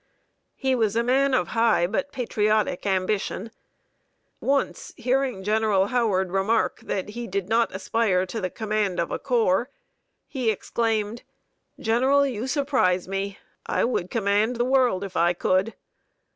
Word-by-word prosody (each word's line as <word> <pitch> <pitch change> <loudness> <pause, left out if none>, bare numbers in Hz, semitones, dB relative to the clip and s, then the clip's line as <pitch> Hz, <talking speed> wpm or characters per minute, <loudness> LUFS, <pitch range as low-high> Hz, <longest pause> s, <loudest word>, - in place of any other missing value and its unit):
He 265 -1 0
was 220 -4 +1
a 235 - +2
man 265 +2 +2
of 180 - 0
high 225 -5 +3
but 250 +10 -2
patriotic 215 -5 0
ambition. 195 +2 -1 0.9
Once, 275 0 -1
hearing 255 -4 0
General 210 -2 +2
Howard 200 -7 +1
remark 195 +4 +1
that 190 0 -4
he 235 +2 -6
did 195 -1 -3
not 230 +2 +2
aspire 190 -1 0
to 220 +4 -5
the 185 - -1
command 210 -3 -1
of 170 - -1
a - - -2
corps, 240 -3 +1 0.6
he 255 -5 -1
exclaimed, 220 +1 -1 0.6
"General 265 +5 +3
you 250 -2 -3
surprise 265 - +1
me. 195 +1 -3 0.3
I - - +1
would 185 -7 -1
command 215 +2 +1
the 240 +1 0
world, 250 -7 +2
if 190 -2 -7
I 170 +1 +3
could!" 185 +5 0
220 Hz, 145 wpm, -25 LUFS, 195-245 Hz, 0.9 s, high